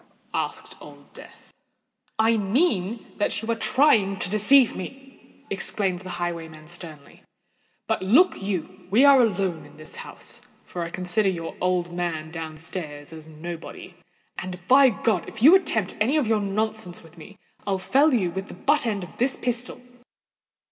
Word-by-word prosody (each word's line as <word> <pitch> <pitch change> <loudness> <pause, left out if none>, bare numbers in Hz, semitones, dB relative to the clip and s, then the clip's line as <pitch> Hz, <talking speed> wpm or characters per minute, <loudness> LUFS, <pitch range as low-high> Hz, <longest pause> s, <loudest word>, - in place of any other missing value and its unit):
asked - - -4
Old - - -14
Death. - - -14 0.6
"I 225 +1 +4
mean 215 - 0
that 205 - 0
you 225 +1 -3
are - - +1
trying 215 -3 +3
to 180 - 0
deceive 225 +5 +5
me," 270 +8 -11
exclaimed 190 -4 -1
the 185 0 -9
highwayman, 165 -3 -5
sternly. 160 -4 -9 0.6
"But, - - -1
look 250 - +4
you! 185 -1 -4
we 230 +9 +5
are 275 -2 +8
alone 195 -7 0
in - - -16
this 155 0 -7
house—for 175 - -7
I 170 - -3
consider 185 +3 0
your 165 -3 -4
old 180 -1 0
man 165 -3 -3
down 160 -2 -6
stairs 155 -2 -5
as 160 -1 -9
nobody; 170 +3 -8 0.5
and, 180 0 -7
by 270 +1 +7
God! 220 -5 -1
if 220 0 -7
you 310 +6 +9
attempt 225 - +2
any 260 +8 +3
of 295 - +2
your 220 -1 +2
nonsense 215 -2 -2
with 165 0 -17
me, 200 +6 -13 0.3
I'll 195 -1 +1
fell 265 +12 +3
you 195 -9 +1
with 190 +3 -5
the - - -10
butt 285 +6 +2
end 205 -4 -1
of 180 - -11
this 255 +2 +2
pistol." 245 0 -2
195 Hz, 160 wpm, -24 LUFS, 175-230 Hz, 0.6 s, you